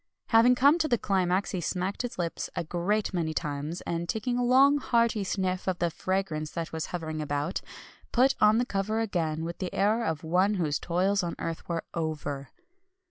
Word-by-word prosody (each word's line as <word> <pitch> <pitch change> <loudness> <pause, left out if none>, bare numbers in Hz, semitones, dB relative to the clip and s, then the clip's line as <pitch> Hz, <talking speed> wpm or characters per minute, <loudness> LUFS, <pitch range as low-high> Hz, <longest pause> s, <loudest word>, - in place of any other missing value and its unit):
Having 235 +2 +6
come 285 +6 +5
to 315 - +2
the 240 -5 +2
climax, 190 -2 0
he 185 - -2
smacked 185 +3 -2
his 245 -1 -5
lips 170 -2 -3
a - - -1
great 185 +6 -1
many 160 -3 -1
times, 150 +3 -3
and 170 0 -3
taking 235 +3 -1
a 245 - +1
long 270 +4 +5
hearty 235 -5 +2
sniff 185 -1 -2
of 185 -2 0
the 170 -1 0
fragrance 165 -3 -2
that 165 +1 -5
was 160 -1 -3
hovering 160 -3 -4
about, 145 +3 -2 0.5
put 260 +3 +4
on 215 +1 +6
the 245 - +2
cover 210 0 -1
again 165 -7 -1
with 170 +1 -6
the 185 -2 -3
air 215 +4 +2
of 160 -7 -2
one 185 +6 +2
whose 155 -6 0
toils 190 +4 +1
on 175 -2 -3
earth 165 +1 -5
were 165 -1 -1
over. 150 -4 -3
185 Hz, 190 wpm, -28 LUFS, 165-215 Hz, 0.5 s, Having